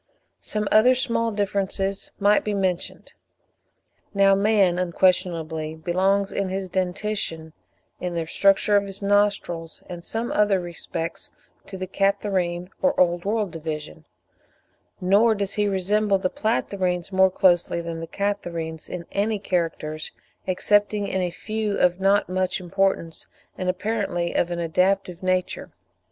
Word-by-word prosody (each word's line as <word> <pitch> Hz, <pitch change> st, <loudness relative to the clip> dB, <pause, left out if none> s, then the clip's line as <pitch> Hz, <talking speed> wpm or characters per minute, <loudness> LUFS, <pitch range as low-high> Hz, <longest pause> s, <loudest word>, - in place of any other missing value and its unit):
Some 210 Hz, -1 st, -2 dB
other 245 Hz, +4 st, +6 dB
small 230 Hz, -2 st, 0 dB
differences 195 Hz, -1 st, -1 dB
might 205 Hz, +1 st, +4 dB
be 210 Hz, -1 st, -1 dB
mentioned. 185 Hz, -3 st, -2 dB, 1.0 s
Now 195 Hz, 0 st, +5 dB
man 195 Hz, -3 st, +3 dB
unquestionably 170 Hz, -3 st, 0 dB
belongs 190 Hz, +5 st, +1 dB
in 195 Hz, -1 st, -2 dB
his 190 Hz, 0 st, -3 dB
dentition, 180 Hz, -3 st, -2 dB, 0.5 s
in 180 Hz, -1 st, -3 dB
the 165 Hz, -1 st, -1 dB
structure 195 Hz, +4 st, +3 dB
of 200 Hz, 0 st, +3 dB
his 195 Hz, +1 st, -6 dB
nostrils, 200 Hz, -5 st, 0 dB
and 175 Hz, -2 st, -8 dB
some 225 Hz, +5 st, -3 dB
other 205 Hz, -2 st, +3 dB
respects, 170 Hz, -1 st, -5 dB, 0.4 s
to 190 Hz, -, -7 dB
the 185 Hz, -, -3 dB
Catarrhine 190 Hz, -2 st, 0 dB
or 275 Hz, -, +2 dB
Old 175 Hz, 0 st, +2 dB
World 210 Hz, -2 st, 0 dB
division; 155 Hz, -, -6 dB, 0.9 s
nor 205 Hz, +5 st, +4 dB
does 200 Hz, -1 st, -3 dB
he 210 Hz, -1 st, +1 dB
resemble 200 Hz, +1 st, +2 dB
the 185 Hz, -1 st, -1 dB
Platyrrhines 190 Hz, -5 st, -1 dB
more 190 Hz, 0 st, +5 dB
closely 175 Hz, -2 st, +2 dB
than 170 Hz, -1 st, -5 dB
the 165 Hz, -, -6 dB
Catarrhines 170 Hz, -6 st, -3 dB
in 175 Hz, -2 st, -6 dB
any 210 Hz, +2 st, 0 dB
characters, 165 Hz, -5 st, -2 dB, 0.4 s
excepting 205 Hz, +2 st, +2 dB
in 190 Hz, -, -1 dB
a 180 Hz, -, 0 dB
few 215 Hz, +3 st, -3 dB
of 180 Hz, +1 st, +2 dB
not 195 Hz, +1 st, +3 dB
much 185 Hz, +1 st, -1 dB
importance 180 Hz, -2 st, -1 dB, 0.3 s
and 185 Hz, -1 st, -2 dB
apparently 185 Hz, -3 st, -1 dB
of 175 Hz, -, +1 dB
an 175 Hz, -, -3 dB
adaptive 180 Hz, +2 st, 0 dB
nature. 185 Hz, -1 st, -1 dB
190 Hz, 135 wpm, -24 LUFS, 175-205 Hz, 1.0 s, other